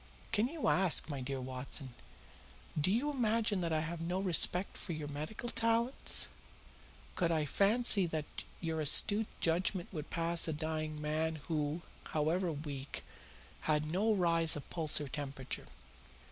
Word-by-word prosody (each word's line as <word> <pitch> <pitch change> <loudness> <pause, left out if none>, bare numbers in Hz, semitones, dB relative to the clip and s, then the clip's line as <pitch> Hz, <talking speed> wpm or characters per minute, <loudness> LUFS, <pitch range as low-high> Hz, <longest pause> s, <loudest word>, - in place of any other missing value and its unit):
"Can 230 +1 +2
you 315 +2 -3
ask, 185 -3 +4
my 140 -3 -3
dear 135 +1 -3
Watson? 130 +1 -5 0.8
Do 150 +3 +1
you 245 +9 +1
imagine 225 -6 +1
that 170 -1 -1
I 155 -1 +1
have 165 +1 -4
no 175 +3 -1
respect 180 0 +2
for 175 - -5
your 155 -2 -5
medical 155 +11 -5
talents? 230 +2 +3 0.9
Could 170 -2 +1
I 155 -2 +1
fancy 200 - +4
that 155 -2 -3 0.3
your 160 -2 -2
astute 205 +8 +4
judgment 175 +3 0
would 155 -3 -5
pass 170 0 +2
a 160 - 0
dying 155 0 -3
man 155 +2 -1
who, 155 0 -1 0.2
however 165 +4 0
weak, 145 -2 -6 0.7
had 150 0 +1
no 205 +6 +2
rise 170 -4 +4
of 145 - -7
pulse 160 -3 +2
or 145 - -4
temperature? 135 -1 -4
165 Hz, 145 wpm, -34 LUFS, 150-190 Hz, 0.9 s, ask